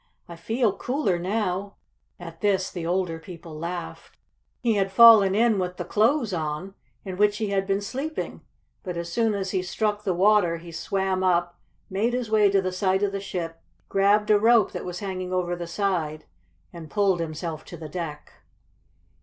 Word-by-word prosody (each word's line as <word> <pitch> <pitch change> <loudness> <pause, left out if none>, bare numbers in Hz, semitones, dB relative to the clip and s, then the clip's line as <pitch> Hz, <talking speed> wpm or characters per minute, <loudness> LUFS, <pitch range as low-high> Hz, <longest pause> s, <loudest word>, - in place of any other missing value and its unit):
"I 170 - -9
feel 220 +5 0
cooler 245 - -1
now." 195 +1 -2 0.4
At 165 -1 -10
this 190 -2 +1
the 170 -2 -5
older 175 -2 -1
people 165 -1 -10
laughed. 175 +1 -6 0.4
He 235 -3 +1
had 195 -2 0
fallen 210 -2 +8
in 225 -2 +3
with 180 -1 -3
the - - -4
clothes 225 0 +2
on, 160 +3 -3 0.3
in 185 -2 -5
which 210 +1 +3
he 215 -2 -2
had 195 -1 0
been 195 0 0
sleeping, 275 +9 -5 0.4
but 180 -3 -5
as 170 0 -5
soon 225 -3 +1
as 190 -1 -3
he 190 - 0
struck 210 +3 -2
the 190 -4 0
water 190 -3 +3
he 170 +1 -11
swam 190 +2 -1
up, 175 -1 +1 0.3
made 215 +6 0
his 245 -3 -2
way 210 -2 +5
to 195 -1 +2
the 185 - -1
side 190 +1 +1
of 200 - +1
the 200 - -3
ship, 165 -4 -5 0.3
grabbed 205 +2 +3
a 210 - +5
rope 225 -1 +4
that - - -6
was 180 -1 -5
hanging 185 -2 -4
over 180 -1 -1
the 175 -1 -6
side, 170 -5 -2 0.5
and 165 -3 -9
pulled 200 -4 +2
himself 160 0 -4
to 175 - -9
the 160 -1 -8
deck. 150 -2 -6
190 Hz, 185 wpm, -25 LUFS, 175-210 Hz, 0.5 s, fallen